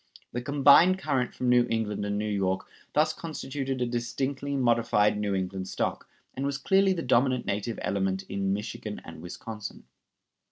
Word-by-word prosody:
The 120 Hz, -, -3 dB
combined 145 Hz, +7 st, +6 dB
current 135 Hz, -8 st, -1 dB
from 125 Hz, -, -1 dB
New 125 Hz, 0 st, +5 dB
England 110 Hz, -3 st, -1 dB
and 100 Hz, 0 st, -1 dB
New 105 Hz, -, -1 dB
York 95 Hz, -2 st, 0 dB, 0.3 s
thus 155 Hz, +1 st, +3 dB
constituted 135 Hz, -4 st, -4 dB
a 125 Hz, -, +1 dB
distinctly 130 Hz, +4 st, -2 dB
modified 115 Hz, -5 st, +3 dB
New 105 Hz, -1 st, -1 dB
England 95 Hz, 0 st, -3 dB
stock, -, -, -3 dB, 0.2 s
and 135 Hz, -, -4 dB
was 140 Hz, 0 st, -1 dB
clearly 190 Hz, +6 st, +3 dB
the 170 Hz, -3 st, -3 dB
dominant 125 Hz, 0 st, +2 dB
native 105 Hz, +3 st, -2 dB
element 95 Hz, -1 st, 0 dB
in 95 Hz, 0 st, -2 dB
Michigan 105 Hz, +1 st, -4 dB
and 80 Hz, -1 st, -10 dB
Wisconsin. 105 Hz, +5 st, -7 dB
120 Hz, 160 wpm, -28 LUFS, 100-140 Hz, 0.3 s, combined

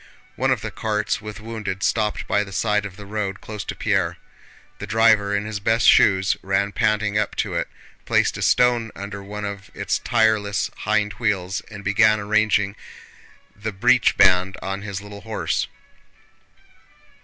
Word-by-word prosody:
One -, -, 0 dB
of -, -, +1 dB
the -, -, -5 dB
carts 105 Hz, -1 st, -2 dB
with 105 Hz, -1 st, -8 dB
wounded 110 Hz, -3 st, -5 dB
stopped 105 Hz, -2 st, 0 dB
by 105 Hz, -, +2 dB
the 100 Hz, -, -11 dB
side 105 Hz, 0 st, 0 dB
of 95 Hz, -1 st, -14 dB
the 105 Hz, -, -10 dB
road 100 Hz, -1 st, -3 dB
close 105 Hz, -1 st, -7 dB
to -, -, -5 dB
Pierre. -, -, 0 dB, 0.6 s
The -, -, -6 dB
driver 110 Hz, -3 st, +3 dB
in 100 Hz, +1 st, -1 dB
his 110 Hz, -1 st, -4 dB
bast 115 Hz, +3 st, +2 dB
shoes 95 Hz, -1 st, +5 dB
ran 95 Hz, +1 st, 0 dB
panting 105 Hz, -1 st, +1 dB
up 105 Hz, -, -2 dB
to -, -, -2 dB
it, -, -, -1 dB, 0.4 s
placed -, -, +2 dB
a -, -, -6 dB
stone 120 Hz, -2 st, +3 dB
under 100 Hz, +1 st, -7 dB
one 105 Hz, +1 st, -6 dB
of 100 Hz, -1 st, -6 dB
its -, -, -1 dB
tireless 105 Hz, -2 st, +1 dB
hind 105 Hz, -1 st, 0 dB
wheels, 100 Hz, -4 st, -1 dB
and 100 Hz, -2 st, -9 dB
began 110 Hz, +2 st, +4 dB
arranging 105 Hz, -1 st, +1 dB, 0.8 s
the 110 Hz, +2 st, -4 dB
breech 125 Hz, +5 st, +3 dB
band 90 Hz, +1 st, +4 dB
on 95 Hz, +1 st, -4 dB
his 100 Hz, -2 st, -5 dB
little 100 Hz, 0 st, -10 dB
horse. 110 Hz, 0 st, -2 dB
105 Hz, 165 wpm, -22 LUFS, 100-110 Hz, 0.8 s, shoes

